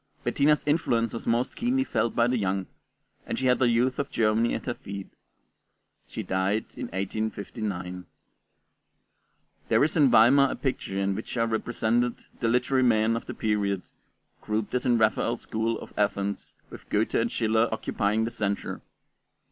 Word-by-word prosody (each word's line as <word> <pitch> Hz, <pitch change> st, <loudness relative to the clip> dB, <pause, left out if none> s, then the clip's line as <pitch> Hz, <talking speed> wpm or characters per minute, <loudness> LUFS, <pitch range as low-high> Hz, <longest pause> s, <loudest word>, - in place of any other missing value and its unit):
Bettina's 150 Hz, +1 st, +2 dB
influence 125 Hz, -7 st, +1 dB
was 115 Hz, -, -6 dB
most 120 Hz, +3 st, +1 dB
keenly 255 Hz, +3 st, +1 dB
felt 120 Hz, -, -1 dB
by 115 Hz, -, +4 dB
the 125 Hz, +1 st, +1 dB
young, 95 Hz, -1 st, -1 dB, 0.6 s
and -, -, -2 dB
she 130 Hz, -, -2 dB
had 125 Hz, -1 st, +3 dB
the 125 Hz, -2 st, +4 dB
youth 125 Hz, +2 st, +1 dB
of 140 Hz, 0 st, -1 dB
Germany 115 Hz, +1 st, +2 dB
at -, -, -5 dB
her -, -, -1 dB
feet. 100 Hz, -1 st, -8 dB, 1.0 s
She -, -, -5 dB
died 95 Hz, +3 st, 0 dB
in -, -, -5 dB
1859. 95 Hz, -2 st, -4 dB, 1.6 s
There -, -, +4 dB
is 155 Hz, -, +1 dB
in 145 Hz, -5 st, +5 dB
Weimar 135 Hz, +5 st, +6 dB
a -, -, -3 dB
picture 130 Hz, -7 st, -3 dB
in 100 Hz, 0 st, +1 dB
which 110 Hz, +5 st, -5 dB
are 115 Hz, -, +2 dB
represented 115 Hz, +1 st, -1 dB
the 115 Hz, -, 0 dB
literary 125 Hz, +3 st, +2 dB
men 115 Hz, -2 st, +3 dB
of 115 Hz, -, -5 dB
the -, -, -6 dB
period, 100 Hz, -3 st, 0 dB, 0.6 s
grouped 105 Hz, 0 st, -2 dB
as 125 Hz, 0 st, 0 dB
in 120 Hz, -1 st, +4 dB
Raphael's 115 Hz, +2 st, +1 dB
School 110 Hz, +1 st, -1 dB
of -, -, -11 dB
Athens, 100 Hz, -1 st, -1 dB, 0.2 s
with -, -, -12 dB
Goethe 105 Hz, +2 st, 0 dB
and 115 Hz, 0 st, +1 dB
Schiller 110 Hz, 0 st, +2 dB
occupying 110 Hz, 0 st, 0 dB
the 115 Hz, -, -3 dB
centre. 100 Hz, -3 st, -3 dB
115 Hz, 165 wpm, -27 LUFS, 105-125 Hz, 1.6 s, Weimar